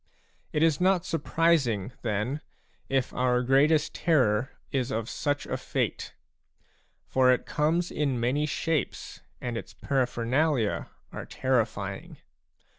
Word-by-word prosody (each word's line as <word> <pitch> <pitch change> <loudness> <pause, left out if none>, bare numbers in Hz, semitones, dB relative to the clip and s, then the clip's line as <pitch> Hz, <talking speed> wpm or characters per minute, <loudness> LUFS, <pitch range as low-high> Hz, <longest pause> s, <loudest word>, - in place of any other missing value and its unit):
a - - -3
It 150 - +3
is 165 -1 +3
not 185 -1 +3
surprising, 145 - +1
then, 115 +6 -1 0.5
if 135 -2 0
our 125 0 +2
greatest 145 +4 +3
terror 130 -7 +2 0.2
is 130 -3 0
of 115 -4 -2
such 145 +2 -2
a - - -2
fate; - - -3 0.9
for 130 -1 +4
it 125 - +1
comes 165 +4 0
in 140 -5 0
many 135 +6 +1
shapes 155 -1 -2 0.2
and 120 -2 -3
its 115 - -7
para 135 -3 0
phernalia 125 -1 0 0.2
are - - -7
terrifying. 105 -7 -1
135 Hz, 125 wpm, -28 LUFS, 120-150 Hz, 0.9 s, for